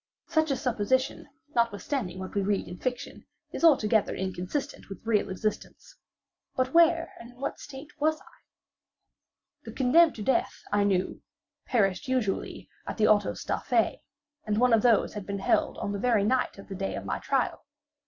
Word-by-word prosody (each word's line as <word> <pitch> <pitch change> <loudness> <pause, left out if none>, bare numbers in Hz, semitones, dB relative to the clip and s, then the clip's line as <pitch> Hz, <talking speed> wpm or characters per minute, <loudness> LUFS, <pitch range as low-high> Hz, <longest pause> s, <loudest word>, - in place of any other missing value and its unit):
Such 315 -1 +1
a 275 - +1
supposition, 255 +2 0 0.3
notwithstanding 230 -3 -1
what 185 0 -7
we 200 - +1
read 200 0 0
in 175 - -9
fiction, 255 +1 -5 0.2
is - - -6
altogether 225 -9 +4
inconsistent 190 +11 -4
with 195 - -10
real 215 -3 +1
existence;—but 255 - -5
where 335 0 +4
and 235 - -11
in 245 - -22
what 275 - -4
state 280 +1 -10
was 310 +1 +2
I? - - -21 1.2
The - - -8
condemned 305 +6 +4
to 215 - -6
death, 265 - 0
I 205 0 +3
knew, 190 -2 0 0.5
perished 195 -5 +1
usually 250 -7 -2 0.2
at - - -4
the 215 - +4
autos 205 -1 +2
da - - -1
fe, - - 0 0.4
and 210 -1 -1
one 250 -1 +4
of 225 - +5
these 235 -2 +3
had 210 -2 -7
been 200 0 -3
held 195 - +1
on 200 - -3
the 200 - -3
very 230 -3 +2
night 255 +2 0
of 195 - -12
the 195 - -7
day 195 0 -3
of - - -6
my - - -2
trial. - - -1
225 Hz, 175 wpm, -28 LUFS, 200-265 Hz, 1.2 s, of